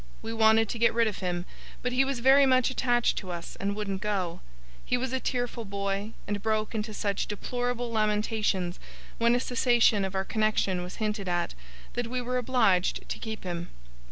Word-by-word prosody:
We 225 - -4
wanted 225 0 +5
to 235 - -4
get 235 0 +4
rid 230 -1 +4
of 210 - -3
him, 180 -1 -2 0.4
but 250 - 0
he 255 +2 +4
was 265 -3 -2
very 270 +2 +6
much 255 0 +4
attached 240 -2 +2
to 190 - -9
us, 170 -1 -6
and 200 +1 -2
wouldn't 200 -2 -3
go. 195 -5 -1 0.4
He 250 - +1
was 260 +1 -3
a 260 - +1
tearful 245 -2 -2
boy, 200 +1 -3
and 205 -1 -2
broke 215 0 0
into 215 0 -2
such 200 -1 -1
deplorable 245 +3 -2
lamentations, 210 -4 0 0.4
when 235 +1 +4
a - - +2
cessation 240 -4 +3
of 190 0 -3
our 190 0 0
connexion 215 -4 +1
was 180 +1 -7
hinted 210 -3 -2
at, 175 - 0 0.4
that 245 -1 -2
we 250 +2 -2
were 250 +1 -1
obliged 230 -8 +2
to - - -4
keep 220 -1 -5
him. 175 -2 -4
220 Hz, 190 wpm, -28 LUFS, 195-245 Hz, 0.4 s, very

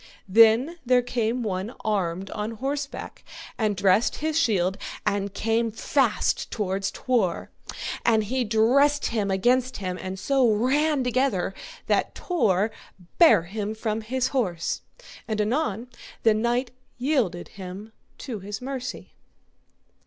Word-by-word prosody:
Then 230 - +5
there 250 0 +3
came 240 0 -1
one 200 +3 -3
armed 190 -3 -1
on 215 +1 -3
horseback, 275 +5 -5 0.3
and 215 -3 0
dressed 195 +4 +3
his 315 0 -2
shield, 195 - +1 0.3
and 200 -1 0
came 225 +3 0
fast 240 +2 0
toward 195 -3 -2
Tor, 225 -10 -1 0.5
and 220 -2 +3
he 250 +5 -1
dressed 250 +7 +3
him 210 -3 0
against 250 +7 +2
him, 185 -2 -4
and 190 0 -5
so 265 +3 +2
ran 270 +6 +2
together 250 -7 0 0.3
that - - 0
Tor 215 - +1 0.5
bare 320 - +7
him 205 +4 -4
from 220 0 -2
his 255 +3 -1
horse. 180 -11 -1 0.5
And 215 -2 -2
anon 225 0 0 0.4
the 225 - +5
knight 240 +3 0 0.3
yielded 245 - 0
him 195 +3 -9 0.2
to 240 -7 -6
his 200 +2 -6
mercy. 260 -1 -6
225 Hz, 125 wpm, -25 LUFS, 200-255 Hz, 0.5 s, bare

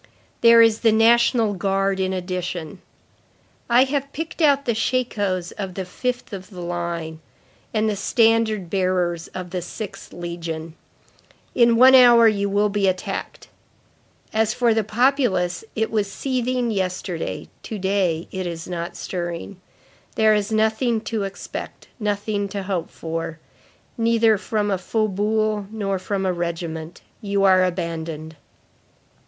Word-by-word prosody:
There 230 0 +8
is 225 -1 +3
the 225 - +4
National 230 0 +4
Guard 195 0 0
in 190 0 0
addition. 180 -1 -4 0.9
I 240 +2 +6
have 280 +1 -2
picked 325 +3 -5
out 280 -2 +4
the 235 - +1
shakos 210 -6 -1
of 190 -3 -4
the 190 - -4
fifth 245 +5 -4
of 190 -1 -7
the 185 -4 -10
line, 170 -2 -4 0.5
and 215 0 +1
the 210 - 0
standard 220 -2 +2
bearers 180 -2 0
of 180 -1 -6
the 180 -1 -2
sixth 205 +3 -8
legion. 165 -2 -6 0.8
In 235 -1 +4
one 255 +3 +7
hour 240 -3 +8
you 200 -2 +1
will 205 +1 +2
be 200 -1 +1
attacked. 185 -1 -3 0.9
As 220 +1 +1
for 240 -2 +3
the 220 0 +1
populace, 215 -6 +1
it 220 0 -1
was 210 -3 0
seething 250 -1 -1
yesterday, 185 -3 -3
to 220 - -6
day 190 -4 0
it 185 -2 -3
is 170 -1 -6
not 170 -1 -5
stirring. 175 +1 -5 0.5
There 220 -1 +4
is 210 0 0
nothing 220 +1 +1
to 220 -2 -2
expect; 195 0 -8
nothing 205 -1 -1
to 200 0 -4
hope 185 -3 -3
for. 165 -1 -5 0.6
Neither 225 -2 +3
from 210 -1 -1
a 190 - 0
faubourg 215 +1 0
nor 200 -3 -2
from 195 +1 -2
a 185 - +1
regiment. 170 -1 -4 0.2
You 200 -2 0
are 185 -1 +5
abandoned." 165 -3 -3
200 Hz, 140 wpm, -22 LUFS, 180-225 Hz, 0.9 s, There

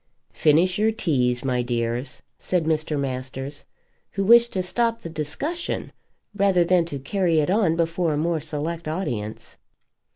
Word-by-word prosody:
"Finish 175 +5 +3
your 220 +1 +3
teas, 125 - 0
my 125 -2 +1
dears," 120 +1 -2 0.2
said 180 -3 0
Mr. 155 -2 0
Masters, 135 +1 -4 0.5
who 195 - -1
wished 235 +3 +6
to 185 - -1
stop 230 +5 0
the 165 - -6
discussion 220 - -3 0.4
rather 195 -3 +3
than 175 0 +3
to 145 -4 -5
carry 165 +4 +1
it 150 +3 +1
on 195 -6 +3
before 165 0 0
a - - -1
more 165 +1 0
select 155 +2 -4
audience. 120 - -4
160 Hz, 150 wpm, -24 LUFS, 140-185 Hz, 0.5 s, wished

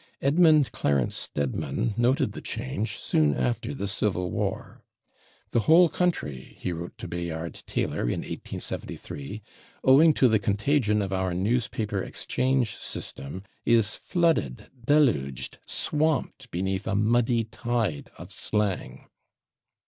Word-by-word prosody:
Edmund 155 0 +4
Clarence 70 -3 +1
Stedman 70 - -2
noted 120 +4 +2
the - - -8
change 100 - -3
soon 75 -2 +2
after 65 -1 -1
the 100 - -3
Civil 95 -2 0
War. - - -3 0.7
"The - - +3
whole 170 +1 +8
country," 115 - -2
he 90 - -2
wrote 85 +1 -7
to - - -7
Bayard 85 -1 -5
Taylor - - -1
in - - -1
1873, 75 +10 -6 0.4
"owing 150 +4 +6
to 130 - +5
the 110 -2 +3
contagion 105 +1 +1
of 95 -1 -3
our 95 -2 0
newspaper 105 0 0
'exchange' 125 0 0
system, 70 +8 -6 0.2
is 115 -3 +3
flooded, 165 - 0
deluged, 75 - +2
swamped 150 -4 -1
beneath 95 +2 -2
a 110 - 0
muddy 115 +2 +2
tide 110 -7 -2
of - - -10
slang." 105 -3 -2
105 Hz, 120 wpm, -27 LUFS, 85-130 Hz, 0.7 s, whole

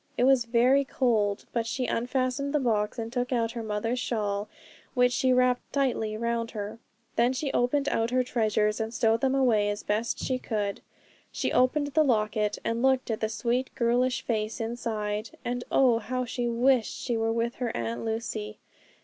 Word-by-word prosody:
It - - +2
was 260 -2 +4
very 250 +4 +4
cold, 220 -7 0
but 230 -1 -1
she 250 +2 -1
unfastened 255 +4 -1
the - - +4
box 215 -5 0
and 230 0 -5
took 250 0 -1
out 230 -2 +1
her 235 - -5
mother's 225 +3 -2
shawl, 210 -4 -2 0.5
which 250 -1 +4
she 260 +1 +2
wrapped 250 0 +2
tightly 240 -6 0
round 235 0 -1
her. 215 0 -6 0.4
Then 240 +2 +3
she 270 +1 -2
opened 275 +4 +1
out 225 -5 +1
her 255 +1 +2
treasures 215 -3 +1
and 220 0 -2
stowed 225 0 +2
them 270 0 +2
away 225 -6 +3
as 205 0 -3
best 215 +3 -1
she 255 -1 -2
could. 205 -5 -2 0.5
She - - -2
opened 285 +3 +2
the 310 +2 +3
locket, 215 -5 +1
and 230 +1 -1
looked 260 -2 +2
at 220 - -2
the 220 - -1
sweet, 245 +3 -1
girlish 245 +2 +1
face 220 0 -2
inside 220 -2 -3
and 245 0 -2
oh, 245 -4 +4
how 255 +3 -3
she 245 0 -2
wished 240 0 +2
she 240 - -2
were 225 0 0
with 230 +1 0
her 245 - 0
Aunt 115 0 -3
Lucy. 220 -1 -4
235 Hz, 185 wpm, -27 LUFS, 220-255 Hz, 0.5 s, was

